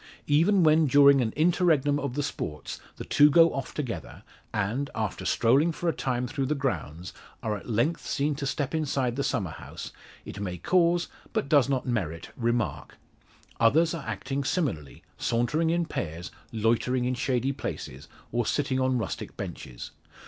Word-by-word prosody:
Even 170 +6 +4
when 155 0 +5
during 140 0 +6
an 110 -3 0
interregnum 155 -3 +3
of 140 -3 -3
the 145 - 0
sports 75 - -5 0.2
the - - -7
two 145 0 +6
go 165 +2 +6
off 135 - -4
together, 130 -6 -5 0.3
and, 115 +8 -1
after 110 -4 -3
strolling 140 +9 +3
for 170 +2 -4
a 165 - +2
time 125 -2 -1
through 135 +1 -2
the 150 - 0
grounds, 90 - -3 0.3
are 110 -1 -1
at 105 - -9
length 120 +9 +1
seen 145 +2 0
to 140 0 -4
step 140 +1 -2
inside 135 -6 0
the 140 - -1
summer 95 -10 -1
house, - - -8 0.3
it - - -8
may 90 -3 -4
cause, 170 - +2 0.3
but - - 0
does 140 -3 +4
not 135 -2 0
merit, 90 - -3
remark. 120 -1 -2 0.6
Others 155 +9 +4
are 160 -7 -6
acting 135 +7 -3
similarly, 130 - -2 0.2
sauntering 125 +8 +1
in 170 +1 +1
pairs, 85 - -5 0.2
loitering 120 +3 +1
in 125 - 0
shady 125 +1 0
places, 70 - -6 0.2
or 120 +1 +1
sitting 135 +2 0
on 130 -1 +2
rustic 110 -5 -5
benches. - - -7
135 Hz, 165 wpm, -27 LUFS, 115-150 Hz, 0.6 s, during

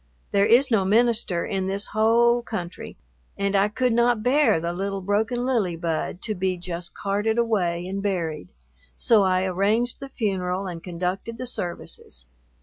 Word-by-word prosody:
There 200 0 +3
is 255 +3 +4
no 215 -4 +3
minister 215 -3 +2
in 190 -1 -2
this 195 +1 -3
whole 235 +2 +3
country 180 -7 -6 0.4
and 200 0 0
I 195 +1 +4
could 240 +3 0
not 235 -1 +2
bear 275 - +4
the 170 +1 -3
little 195 +2 -3
broken 220 +6 0
lily 220 -10 +1
bud 165 +2 -3
to 215 - -1
be 185 -1 -1
just 175 -1 -6
carted 205 +3 -1
away 180 -7 0
and 195 +1 -3
buried, 170 -7 -2 0.5
so 225 -4 +4
I 185 -1 +2
arranged 205 +6 0
the 275 - -8
funeral 190 -6 -2
and 175 -3 -6
conducted 185 +6 -4
the 255 - -5
services. 175 - -5
200 Hz, 160 wpm, -24 LUFS, 180-230 Hz, 0.5 s, is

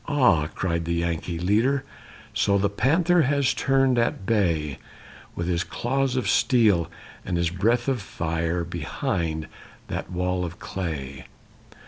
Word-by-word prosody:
"Aha!" 125 - +3
cried 85 -2 -1
the 85 +1 -1
Yankee 85 0 -2
leader, 115 +10 +2 0.5
"So 100 0 +2
the 100 0 +1
panther 165 - +3
has 140 -1 +2
turned 135 -2 +2
at 115 -4 0
bay 85 -10 0 0.6
With 85 - -3
his 90 0 0
claws 135 +1 -1
of 130 - 0
steel 105 -9 +3 0.3
and 90 - -2
his 85 -1 +1
breath 115 +7 +1
of 130 -5 0
fire 85 -1 -2
Behind 80 -1 -3 0.4
that - - -4
wall 90 0 -1
of 85 0 -5
clay! 70 -8 -5
95 Hz, 135 wpm, -25 LUFS, 85-125 Hz, 0.6 s, Aha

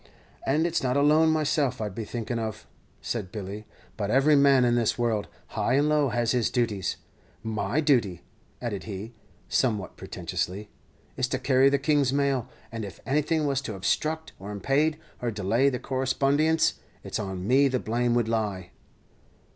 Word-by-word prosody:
"And 150 +5 +2
it's 170 -1 0
not 125 +1 +1
alone 155 +3 +5
myself 150 -4 +1
I'd 105 -3 -3
be 110 +2 -5
thinking 120 +1 -3
of," 110 -1 -5 0.4
said 105 -6 -4
Billy; 105 0 -6 0.3
"but 100 -2 -2
every 135 +6 +4
man 140 -3 +5
in 120 - +3
this 120 -2 +1
world, 115 -4 0 0.2
high 125 - 0
and 145 +2 +3
low, 150 -2 +3
has 120 -1 0
his 125 -3 +1
duties. 115 -6 -1 0.5
My 110 +6 -1
duty," 120 - +1 0.4
added 105 -5 -3
he, 105 +2 -6 0.3
somewhat 110 -7 0
pretentiously, 100 +4 -4 0.5
"is 130 - +1
to 130 - -1
carry 130 +1 +4
the 140 - +2
King's 140 -1 +2
mail; 140 -3 0 0.2
and 115 -1 -5
if 100 - -8
anything 150 +3 +1
was 140 -2 0
to 110 -6 -5
obstruckt, 155 +11 -1
or 100 +2 -7
impade, 140 +9 +1 0.3
or 120 - 0
delay 110 +6 +2
the 125 - -2
correspondience, 140 +5 +1 0.2
it's - - -4
on 95 -2 -4
me 135 +3 +5
the 130 -1 0
blame 120 +1 0
would 120 -2 +2
lie." 105 -5 -2
125 Hz, 165 wpm, -27 LUFS, 110-140 Hz, 0.5 s, alone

